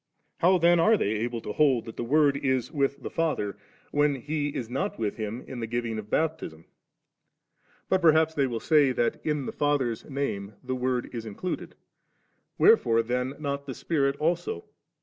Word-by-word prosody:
How 185 +2 +5
then 170 0 +4
are 220 +6 +5
they 100 - 0
able 115 +2 -2
to 105 - -5
hold 135 -6 +3
that 115 - -8
the - - -3
Word 145 +3 +3
is 130 -3 0
with 140 -3 -1
the - - -4
Father, 155 - -1 0.4
when 145 -1 +2
He 145 +3 -2
is 125 -5 -4
not 130 +4 -3
with 110 -3 -2
Him 110 +3 -4
in 130 - -6
the 115 - -3
giving 115 -1 -2
of 105 0 -9
Baptism? 155 - -2 1.2
But 190 0 +2
perhaps 160 -1 +4
they 140 -3 +1
will 120 -2 -3
say, 145 -3 +4
that 120 -1 -1
in 150 -3 -1
the - - -3
Father's 140 -6 0
Name 105 -8 -3
the 130 0 -3
Word 125 -1 -1
is 115 -2 -4
included? 140 - -5 0.8
Wherefore 115 - +5
then 125 +3 -2
not 140 -1 -4
the 130 - -5
Spirit 140 -4 0
also 160 - -1
135 Hz, 180 wpm, -27 LUFS, 115-155 Hz, 1.2 s, How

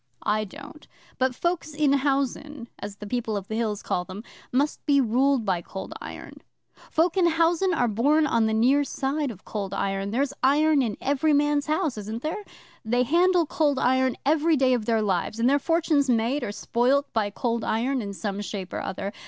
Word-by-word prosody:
'I 215 0 +1
don't; 285 +8 -12 0.3
but 260 -1 +1
folks 345 -2 -2
in 295 -2 +3
housen, 275 -1 -1
as 205 0 -6
the 210 - -9
People 225 -1 -2
of 195 -1 -6
the 220 - -4
Hills 220 -3 -2
call 180 - -1
them, 190 +4 -9 0.3
must 280 +4 0
be 285 -1 +4
ruled 260 0 +2
by 185 -4 0
Cold 190 +3 -7
Iron. - - -9 0.5
Folk 335 +3 +1
in 360 -2 +4
housen 335 +3 +2
are 250 -8 +1
born 285 +9 +2
on 230 -6 +2
the 220 - 0
near 260 +6 +4
side 280 +1 -2
of 200 -6 -10
Cold 200 -2 -4
Iron 195 0 -2
there's 270 +5 0
iron 295 +2 +4
'in 225 -5 -2
every 285 +3 +1
man's 290 0 +2
house, 310 - 0
isn't 220 +3 -6
there? 360 +7 -3 0.4
They 245 +3 +1
handle 345 +5 +3
Cold 290 -2 +1
Iron 260 0 +2
every 315 +2 +3
day 260 -2 +3
of 235 -4 -1
their 225 -1 +1
lives, 195 +2 -1
and 235 - +3
their 285 +2 +4
fortune's 315 -3 +1
made 245 +4 +1
or 205 - -3
spoilt 255 +7 0
by 215 -2 +1
Cold 230 +2 -2
Iron 250 +4 0
in 200 -2 -5
some 200 0 -4
shape 195 -3 -6
or - - -2
other. 195 +2 -4
260 Hz, 195 wpm, -25 LUFS, 220-295 Hz, 0.5 s, be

